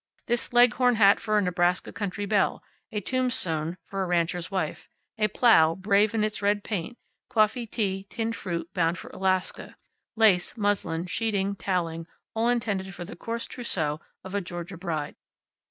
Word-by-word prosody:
This 240 0 -1
leghorn 245 0 +5
hat 200 -2 +6
for 215 -1 +1
a 205 - +3
Nebraska 180 0 +1
country 205 -1 -3
belle; 200 -1 +1 0.3
a 210 - -2
tombstone 180 -10 -1
for 195 0 -4
a 190 - -1
rancher's 175 0 0
wife; 190 -1 -3 0.3
a 215 - +4
plow, 190 -7 +5
brave 205 +3 +2
in 215 - +2
its 215 -1 -2
red 205 0 +1
paint; 215 +3 -4 0.3
coffee, 220 +2 +2
tea, 195 -3 -2
tinned 230 0 -2
fruit, 170 -4 -4
bound 170 -1 +1
for - - -9
Alaska; 185 -1 -1 0.4
lace, 215 -3 +3
muslin, 200 -5 0
sheeting, 200 0 -1
toweling, 170 -4 -2 0.3
all 225 +1 +1
intended 200 -6 -1
for 175 - -6
the - - -9
coarse 230 +6 -4
trousseau 160 - -3 0.2
of 190 0 -8
a 200 - 0
Georgia 175 +1 -6
bride. 165 -5 -3
195 Hz, 160 wpm, -27 LUFS, 175-220 Hz, 0.4 s, hat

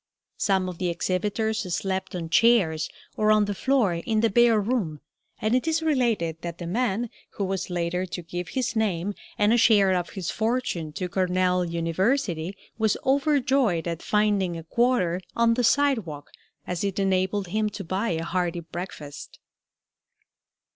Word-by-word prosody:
Some 190 -2 +2
of 180 -2 -6
the 180 - 0
exhibitors 200 +3 -1
slept 190 -1 -3
on 170 -2 -4
chairs 170 -7 +3 0.3
or 215 0 +3
on 215 -1 +4
the 205 - -2
floor 245 -3 +2
in 215 +6 0
the 230 - +2
bare 235 0 +5
room, 200 -9 -1 0.4
and 215 +2 0
it 255 +5 +1
is 320 0 +1
related 230 - 0
that 170 -1 -5
the 175 - -6
man 225 +4 -1 0.3
who 200 - -1
was 190 -1 -2
later 175 +1 -1
to 175 0 -6
give 175 +1 -5
his 245 +5 -2
name 205 -3 0 0.2
and 210 +2 +4
a - - +4
share 205 -4 +5
of 175 -1 -1
his 180 -3 -2
fortune 220 -9 -1
to 180 +3 -3
Cornell 180 0 +1
University 175 - -1 0.2
was 220 -2 +2
overjoyed 270 - +2
at 170 -1 -3
finding 205 -5 +1
a 165 - -7
quarter 185 -3 +1
on 230 0 +4
the 245 +1 0
sidewalk, 225 - +1 0.3
as 180 0 -3
it 200 -2 -2
enabled 190 0 0
him 215 +3 0
to 205 -1 -7
buy 190 +6 -1
a 165 -2 -1
hearty 175 0 -1
breakfast. 165 -3 -8
190 Hz, 160 wpm, -25 LUFS, 175-225 Hz, 0.4 s, bare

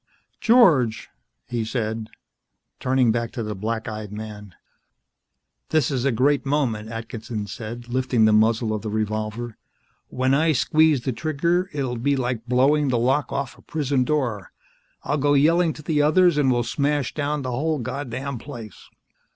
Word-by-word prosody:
"George," 165 - +4 0.4
he 120 -2 -2
said, 110 -1 -3 0.7
turning 130 -2 +2
back 115 0 -1
to 120 - -3
the 105 0 -3
black 110 +3 -3
eyed 110 -2 -6
man. 105 -3 -8 1.1
"This 155 -1 +2
is 130 -2 -1
a 140 - +3
great 135 +5 +2
moment," 130 -7 -1
Atkinson 115 -1 -5
said, 115 +4 -7
lifting 125 -2 +2
the 110 - +4
muzzle 110 +1 +3
of 105 - -3
the 110 - -4
revolver. 110 +2 -3 0.5
"When 130 +1 0
I 155 +3 +3
squeeze 150 +2 +3
the 130 +1 -2
trigger, 170 +7 0
it'll 130 -4 -2
be 140 +4 +1
like 125 -3 -2
blowing 140 +4 +3
the 125 - +1
lock 130 +5 +1
off 135 -3 -4
a - - -17
prison 140 -4 0
door. 125 -8 -1 0.5
I'll 145 +1 -1
go 145 +1 +3
yelling 165 +4 +4
to 150 - -12
the 150 -1 +1
others, 170 +3 +4
and 135 -3 +3
we'll 120 -1 +1
smash 145 +1 -1
down 150 -1 -2
the 130 - -3
whole 155 +5 0
goddamned 130 0 -4
place. 115 -6 -10
125 Hz, 160 wpm, -23 LUFS, 110-145 Hz, 1.1 s, George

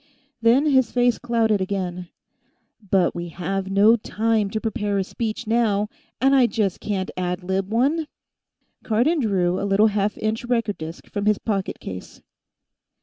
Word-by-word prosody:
Then 240 +6 +4
his 260 -6 +3
face 245 -1 +2
clouded 225 -4 +1
again. 180 -2 -3 0.8
"But 190 -2 +3
we 175 0 -5
have 190 +3 -3
no 205 +4 +5
time 220 -1 0
to 220 - -2
prepare 210 -3 -2
a 195 - +1
speech, 225 +4 -4
now, 215 -2 +1 0.3
and 270 +2 +4
I 255 -3 +5
just 210 -6 -1
can't 195 -3 -3
ad 180 0 -2
lib 190 +2 -2
one." 290 +8 +1 0.7
Cardon 245 +10 +1
drew 190 -6 +1
a 200 - -2
little 200 +2 +4
half 205 +1 0
inch 220 +2 -2
record 230 -4 -1
disk 160 +1 -7
from 205 0 -3
his 210 -1 +4
pocket 195 -4 -3
case. 95 -1 -8
210 Hz, 155 wpm, -23 LUFS, 190-230 Hz, 0.8 s, no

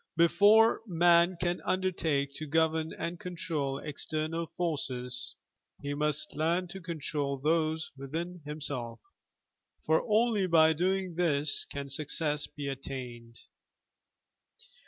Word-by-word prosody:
Before 205 +7 +5
man 175 0 +4
can 175 0 -1
undertake 160 -7 0
to 155 - -5
govern 160 +1 +1
and 170 0 -5
control 165 -6 -2
external 155 +2 -2
forces, 130 -8 -3 0.4
he 140 0 -4
must 150 0 -1
leam 170 +4 +1
to 190 +2 -8
control 150 -4 -2
those 155 +2 0
within 165 +6 -5
himself, 140 -6 -4 0.9
for 160 +1 +3
only 215 -2 +3
by 160 -2 +5
doing 185 +2 0
this 155 -4 +1
can 140 -1 -7
success 150 +1 +1
be 145 -1 -7
attained. 125 -4 -7
160 Hz, 110 wpm, -30 LUFS, 140-175 Hz, 0.9 s, Before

